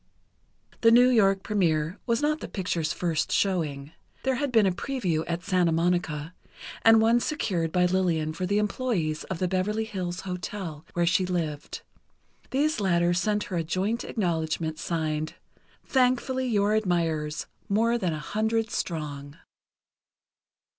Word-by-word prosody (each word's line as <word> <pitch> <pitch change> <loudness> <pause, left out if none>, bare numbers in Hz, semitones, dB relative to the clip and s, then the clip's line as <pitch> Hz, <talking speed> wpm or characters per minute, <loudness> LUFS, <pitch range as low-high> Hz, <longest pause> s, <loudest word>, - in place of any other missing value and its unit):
The 230 - +6
New 245 +2 +7
York 195 -5 +3
première 170 -6 0
was 235 +4 +1
not 305 +1 +1
the - - -6
picture's 175 -5 -2
first 170 -3 -1
showing. 155 -7 0 0.3
There 265 - +1
had 275 +1 -1
been 220 -4 +5
a 190 - +3
preview 180 - -1
at 170 0 -3
Santa 180 -3 +2
Monica, 165 -1 0 0.5
and 225 0 +7
one 230 +2 +4
secured 180 - -1
by 180 +1 +3
Lillian 175 -4 +1
for 180 +3 -3
the 200 +2 +1
employees 210 -7 -1
of 190 - -4
the 185 - 0
Beverley 195 +4 0
Hills 185 -5 -4
Hotel, 180 -3 -5
where 175 -1 +1
she 185 +2 +2
lived. 160 -5 -3 0.7
These 295 0 +1
latter 175 -3 +2
sent 210 +3 0
her 185 - -4
a 165 - 0
joint 190 +8 -1
acknowledgment, 160 -5 -2
signed: 155 -2 -2 0.5
"Thankfully 255 0 +1
your 210 -3 +2
admirers, 165 -7 0 0.2
more 230 +4 +2
than 180 -6 0
a - - -3
hundred 220 +7 -1
strong." 145 -4 -4
185 Hz, 145 wpm, -27 LUFS, 165-220 Hz, 0.7 s, New